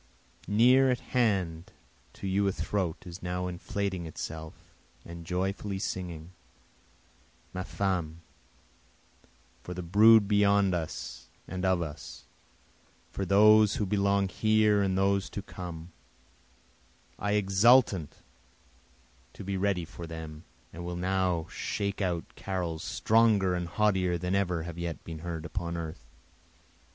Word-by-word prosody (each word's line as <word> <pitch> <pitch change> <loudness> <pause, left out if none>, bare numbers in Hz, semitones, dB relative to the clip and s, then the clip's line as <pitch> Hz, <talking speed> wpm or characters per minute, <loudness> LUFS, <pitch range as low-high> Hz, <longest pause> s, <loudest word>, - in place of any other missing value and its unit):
near 125 +6 +5
at 125 -2 +1
hand 95 -9 0 0.4
to - - -10
you 100 +1 +1
a - - +2
throat 90 0 -2
is 90 +1 -9
now 90 0 -3
inflating 90 0 -3
itself 80 0 -7 0.5
and 85 -1 -9
joyfully 95 +2 -2
singing. 90 -3 -5 1.2
Ma 90 - -3
femme! 90 -5 -2 1.4
for 90 +7 -7
the 90 - -5
brood 105 +4 +6
beyond 100 -2 +3
us 80 -2 -5 0.2
and 95 +1 -5
of 95 -2 +2
us, 75 -2 -9 0.9
For 95 - -3
those 105 +2 +6
who 105 - -1
belong 100 0 +2
here 110 +1 +3
and 95 -1 +1
those 100 0 +1
to 100 - -6
come, 85 -3 -8 1.3
I 105 +1 0
exultant 100 - +3 1.1
to - - -9
be 100 0 -3
ready 95 -3 0
for 85 +1 -9
them 80 -1 -8 0.3
will 85 +2 -5
now 90 -2 0
shake 100 0 -3
out 90 -4 -1
carols 90 -4 -4
stronger 110 -4 +3
and 90 -1 -2
haughtier 95 -2 +1
than 90 +2 -2
have 100 -2 +1
ever 85 -1 -3
yet 85 -1 -5
been 80 -1 -7
heard 85 -1 -5
upon 85 +1 -4
earth. 80 -6 -6
95 Hz, 125 wpm, -29 LUFS, 85-100 Hz, 1.4 s, brood